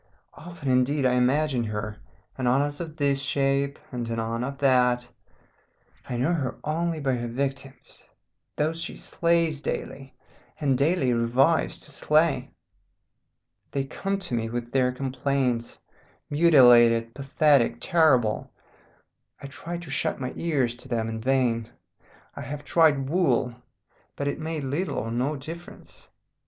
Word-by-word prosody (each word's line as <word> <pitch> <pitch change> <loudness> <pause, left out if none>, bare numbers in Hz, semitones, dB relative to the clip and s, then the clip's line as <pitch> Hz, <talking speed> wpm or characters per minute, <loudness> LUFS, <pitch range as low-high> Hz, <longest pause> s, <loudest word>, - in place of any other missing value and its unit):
Often, 165 -5 -5
indeed, 130 +2 +2
I 125 - +3
imagine 130 +1 +2
her, 105 0 -4 0.4
anon 130 +1 +2
as 145 0 -4
of 160 -2 -7
this 140 -2 +1
shape, 140 -1 0
and 120 -2 -4
anon 115 +1 -2
of 140 +2 -4
that. 125 -3 +3 1.0
I 120 - -2
know 130 +8 +1
her 135 -7 -2
only 165 +1 -1
by 135 -3 0
her 120 0 -4
victims, 135 +2 -5 0.5
those 160 +2 -1
she - - -4
slays 165 -3 0
daily, 135 -2 -5 0.4
and 140 -3 +2
daily 140 -2 +2
revives 125 +7 +2
to 150 - -11
slay. 155 +2 +1 1.2
They 140 - -2
come 195 +8 -3
to 185 -6 -6
me 115 -1 -1
with 120 0 -5
their 130 -1 +2
complaints, 130 -2 -2 0.5
mutilated, 120 -7 +6
pathetic, 140 -1 +2
terrible. 130 - +2 0.9
I - - -10
try 165 +5 -6
to 170 -4 -9
shut - - -1
my 125 -1 -4
ears 135 -8 0
to 125 - -13
them 115 -3 -1
in 110 0 -5
vain. 120 -3 +1 0.7
I - - -7
have 145 +1 -6
tried 145 -3 +3
wool, 135 -7 +1 0.6
but 140 - -3
it 145 - -2
made 160 -1 -4
little 145 +8 -2
or 115 - -3
no 130 +6 -1
difference. 165 +5 -10
135 Hz, 140 wpm, -26 LUFS, 125-155 Hz, 1.2 s, mutilated